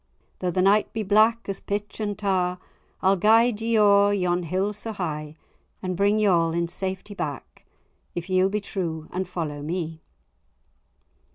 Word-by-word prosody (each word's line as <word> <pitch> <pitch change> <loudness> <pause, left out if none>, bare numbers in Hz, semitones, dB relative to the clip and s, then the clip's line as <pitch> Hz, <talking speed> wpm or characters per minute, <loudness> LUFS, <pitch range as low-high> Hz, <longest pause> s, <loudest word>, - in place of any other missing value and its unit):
Though 180 - -1
the 185 +1 +1
night 205 +2 +3
be 220 - -2
black 220 +3 +3
as 195 - -3
pitch 205 +1 -4
and 205 -2 -2
tar, 185 -3 0 0.5
I'll 190 +1 +4
guide 220 +3 +4
ye 225 0 +1
o'er 205 -1 +5
yon 180 -2 +1
hill 185 +5 -1
so 220 +2 -6
high; 155 -5 -4 0.5
And 185 -1 -2
bring 200 +3 +2
ye 215 - +2
all 165 -4 +3
in 170 0 -1
safety 190 +3 -4
back, 145 - -6 0.5
If 175 0 -4
ye'll 185 0 +3
be 210 +1 -1
true 165 -6 -4
and 185 0 -3
follow 155 -5 -4
me." 160 0 -4
190 Hz, 165 wpm, -25 LUFS, 175-205 Hz, 0.5 s, o'er